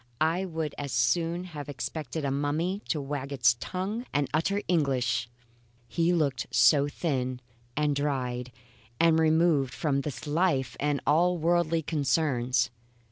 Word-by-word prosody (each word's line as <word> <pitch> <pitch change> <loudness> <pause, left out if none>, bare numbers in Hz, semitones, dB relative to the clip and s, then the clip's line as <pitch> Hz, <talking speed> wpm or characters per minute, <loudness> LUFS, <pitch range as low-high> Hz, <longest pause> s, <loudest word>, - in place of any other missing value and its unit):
I 165 +4 +1
would 160 -4 -3
as 140 -2 -4
soon 165 +9 +1
have 150 -6 -8
expected 145 +2 -4
a 135 - 0
mummy 155 +8 -1
to 155 - 0
wag 140 0 -4
its 120 -4 +3
tongue 200 - -4
and 145 -1 +1
utter 195 +7 +1
English, 130 -8 +1 0.6
he 170 +6 +1
looked 145 -8 0
so 145 -2 +5
thin 130 -5 -2 0.4
and 150 -1 +2
dried 125 -3 -2 0.5
and 165 -1 +5
removed 160 -4 +3
from 140 -4 0
this 135 -5 -6
life 150 -3 +1
and 145 -1 0
all 175 +4 +3
worldly 165 0 +1
concerns. 130 -5 +1
150 Hz, 135 wpm, -28 LUFS, 135-165 Hz, 0.6 s, so